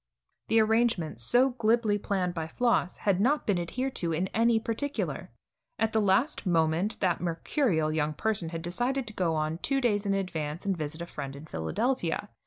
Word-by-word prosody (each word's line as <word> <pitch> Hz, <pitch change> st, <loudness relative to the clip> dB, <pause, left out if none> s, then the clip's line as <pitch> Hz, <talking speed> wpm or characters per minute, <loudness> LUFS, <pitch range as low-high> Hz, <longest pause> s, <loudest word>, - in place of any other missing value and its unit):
The 225 Hz, -, +4 dB
arrangements, 220 Hz, -, +1 dB
so 250 Hz, -, +4 dB
glibly 230 Hz, -3 st, +1 dB
planned 185 Hz, -3 st, -1 dB
by 160 Hz, -2 st, -3 dB
Floss, 235 Hz, -1 st, +1 dB
had 195 Hz, -2 st, +1 dB
not 285 Hz, +7 st, +2 dB
been 195 Hz, -4 st, +1 dB
adhered 255 Hz, +10 st, -3 dB
to 170 Hz, -2 st, -1 dB
in 180 Hz, +4 st, -1 dB
any 230 Hz, 0 st, +3 dB
particular. 235 Hz, +6 st, -3 dB, 0.5 s
At 225 Hz, 0 st, 0 dB
the 220 Hz, -, +3 dB
last 205 Hz, +9 st, +2 dB
moment 170 Hz, +3 st, +1 dB
that 180 Hz, -4 st, +1 dB
mercurial 170 Hz, -, 0 dB
young 155 Hz, -1 st, 0 dB
person 215 Hz, -5 st, 0 dB
had 165 Hz, 0 st, -5 dB
decided 245 Hz, +10 st, -1 dB
to 215 Hz, -, -7 dB
go 170 Hz, -5 st, 0 dB
on 155 Hz, +1 st, -1 dB
two 275 Hz, +6 st, 0 dB
days 210 Hz, -5 st, +1 dB
in 195 Hz, -, +2 dB
advance 165 Hz, -3 st, -3 dB
and 195 Hz, -1 st, +1 dB
visit 155 Hz, +1 st, -5 dB
a -, -, -5 dB
friend 140 Hz, -5 st, -6 dB
in 140 Hz, +2 st, -10 dB
Philadelphia. 195 Hz, -, -1 dB
195 Hz, 185 wpm, -29 LUFS, 165-230 Hz, 0.5 s, The